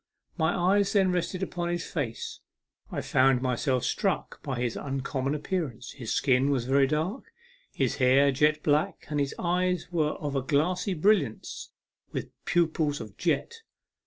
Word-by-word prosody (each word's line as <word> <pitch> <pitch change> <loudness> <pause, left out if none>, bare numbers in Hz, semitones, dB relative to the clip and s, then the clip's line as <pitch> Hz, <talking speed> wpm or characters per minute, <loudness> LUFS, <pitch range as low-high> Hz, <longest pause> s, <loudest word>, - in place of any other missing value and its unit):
My 160 0 +1
eyes 195 +3 +2
then 190 -3 +4
resting 180 +1 -1
upon 175 -2 -3
his 175 0 -2
face, 125 -8 -4 0.5
I - - -2
found 130 0 +3
myself 130 0 0
struck - - -1
by 130 -3 -3
his 120 -2 -1
uncommon 135 0 -2
appearance. 145 - -3
His 120 -5 -6
skin 130 +1 +3
was 130 -4 0
very 135 +1 +4
dark, 160 - -2 0.5
his - - -1
hair 135 +2 +5
jet 150 +3 +2
black, 150 +1 +1
and 150 -1 -1
his 140 -1 -1
eyes 180 0 0
were 155 -3 +1
of 145 -2 -4
a 135 - +1
glassy 175 - 0
brilliance, 160 - +1 0.4
with - - -4
pupils 160 -3 +1
of - - -9
jet. 465 - -1
150 Hz, 155 wpm, -28 LUFS, 135-175 Hz, 0.5 s, hair